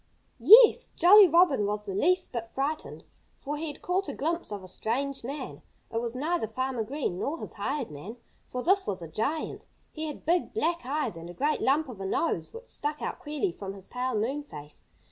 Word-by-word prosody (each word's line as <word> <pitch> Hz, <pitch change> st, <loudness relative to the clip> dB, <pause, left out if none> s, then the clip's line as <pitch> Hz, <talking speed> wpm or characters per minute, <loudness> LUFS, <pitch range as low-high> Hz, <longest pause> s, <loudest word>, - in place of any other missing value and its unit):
Yes! 440 Hz, -, +8 dB
Jolly 395 Hz, +3 st, +8 dB
Robin 305 Hz, -, +4 dB
was 210 Hz, 0 st, -3 dB
the 195 Hz, -, -4 dB
least 360 Hz, -, +2 dB
bit 230 Hz, -2 st, -4 dB
frightened. 285 Hz, +5 st, -3 dB, 0.4 s
For 290 Hz, +1 st, -4 dB
he 320 Hz, +2 st, -4 dB
had 295 Hz, -, -8 dB
caught 375 Hz, +2 st, 0 dB
a -, -, -5 dB
glimpse 335 Hz, -2 st, -1 dB
of 200 Hz, -2 st, -5 dB
a -, -, -10 dB
strange 265 Hz, +8 st, -2 dB
man. 280 Hz, +5 st, -6 dB, 0.3 s
It 230 Hz, -, -1 dB
was 235 Hz, 0 st, -4 dB
neither 305 Hz, -1 st, -1 dB
Farmer 255 Hz, +1 st, -2 dB
Green 250 Hz, -7 st, -3 dB
nor 300 Hz, +4 st, -2 dB
his -, -, -6 dB
hired 255 Hz, -, -3 dB
man, 180 Hz, +11 st, -9 dB, 0.3 s
for 250 Hz, 0 st, -3 dB
this 385 Hz, +2 st, +3 dB
was 185 Hz, -3 st, -2 dB
a -, -, -6 dB
giant. 275 Hz, -, -3 dB, 0.2 s
He 315 Hz, 0 st, -4 dB
had 300 Hz, -, -8 dB
big, 345 Hz, +5 st, +1 dB
black 340 Hz, -, -1 dB
eyes 275 Hz, -, -1 dB
and 165 Hz, +1 st, -9 dB
a 175 Hz, -, -10 dB
great 295 Hz, +3 st, 0 dB
lump 290 Hz, +3 st, +2 dB
of 225 Hz, -7 st, -9 dB
a 195 Hz, -, -3 dB
nose, 330 Hz, -, -1 dB
which 465 Hz, +2 st, -11 dB
stuck 300 Hz, +1 st, -3 dB
out -, -, -4 dB
queerly 300 Hz, +6 st, -2 dB
from 195 Hz, -9 st, -7 dB
his 195 Hz, -1 st, -9 dB
pale 250 Hz, 0 st, -2 dB
moon 250 Hz, +8 st, -1 dB
face. 150 Hz, -, -11 dB
275 Hz, 210 wpm, -28 LUFS, 220-320 Hz, 0.4 s, Yes